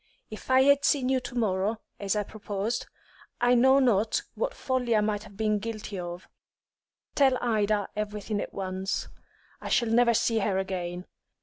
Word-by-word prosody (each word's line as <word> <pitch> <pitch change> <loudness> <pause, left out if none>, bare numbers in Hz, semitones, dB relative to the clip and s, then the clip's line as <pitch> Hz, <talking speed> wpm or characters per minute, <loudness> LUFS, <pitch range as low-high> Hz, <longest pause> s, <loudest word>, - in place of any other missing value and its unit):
If 215 - -9
I 260 0 +6
had 280 +1 +4
seen 260 -3 +2
you 265 -1 +2
to 250 0 -8
morrow, 210 -1 0 0.2
as 200 0 -1
I 210 - 0
proposed, 210 +2 -4 0.5
I 245 0 +4
know 265 +2 +5
not 225 -5 +2
what - - -2
folly 250 -3 0
I 215 - +4
might 210 0 -1
have 200 -2 -15
been 215 -1 +1
guilty 215 -2 -5
of. 175 0 -7 0.9
Tell 265 -2 +4
Ida 215 -3 +1
everything 210 0 -3
at - - -6
once; 190 0 -3 0.5
I - - -6
shall 235 -2 +2
never 235 +1 +4
see 230 0 +2
her 200 -2 0
again. 180 -2 -3
215 Hz, 170 wpm, -27 LUFS, 200-245 Hz, 0.9 s, I